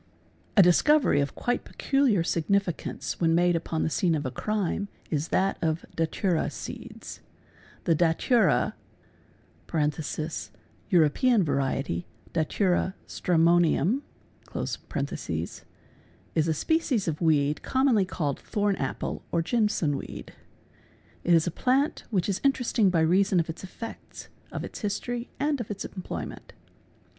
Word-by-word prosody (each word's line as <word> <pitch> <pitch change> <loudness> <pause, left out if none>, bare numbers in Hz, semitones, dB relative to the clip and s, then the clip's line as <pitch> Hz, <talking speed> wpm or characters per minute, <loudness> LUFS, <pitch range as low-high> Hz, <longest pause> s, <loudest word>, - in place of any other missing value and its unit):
A 195 - +10
discovery 180 - +4
of 140 - -3
quite 245 0 -1
peculiar 270 - +1
significance 175 +2 -1
when 165 -1 +4
made 175 0 +3
upon 165 -1 -1
the - - +1
scene 170 +1 +2
of 145 -2 -3
a 130 - -2
crime 205 - -1 0.2
is 150 0 0
that 195 +2 +1
of 160 0 0
datwra 165 +1 0
seeds. - - -8 0.6
The 170 - +3
datura 175 - +3 0.9
(Kuropean 160 - 0
variety 135 - -1 0.3
datura 180 +3 +1
stramonium) 175 - +3 0.5
is 160 -1 -5
a 160 - +2
species 275 - +1
of 155 0 -2
weed 150 -3 +2
commonly 260 -7 +2
called 150 -6 -2
thorn 205 -2 0
apple - - -3
or 170 - +1
jimson 210 - +1
weed. - - -8 0.9
It 175 - +5
is 165 - +4
a 175 - -1
plant 265 - +1
which 190 -6 0
is 200 -1 -1
interesting 250 -6 +3
by 170 -3 +2
reason 185 +3 +3
of 165 -1 0
its 165 - -11
effects, 225 +4 -9 0.2
of - - -4
its - - -7
history, 240 +3 -3
and 290 -2 +1
of 225 - -7
its 205 - -4
employment. 185 -2 -7
175 Hz, 125 wpm, -27 LUFS, 160-215 Hz, 0.9 s, A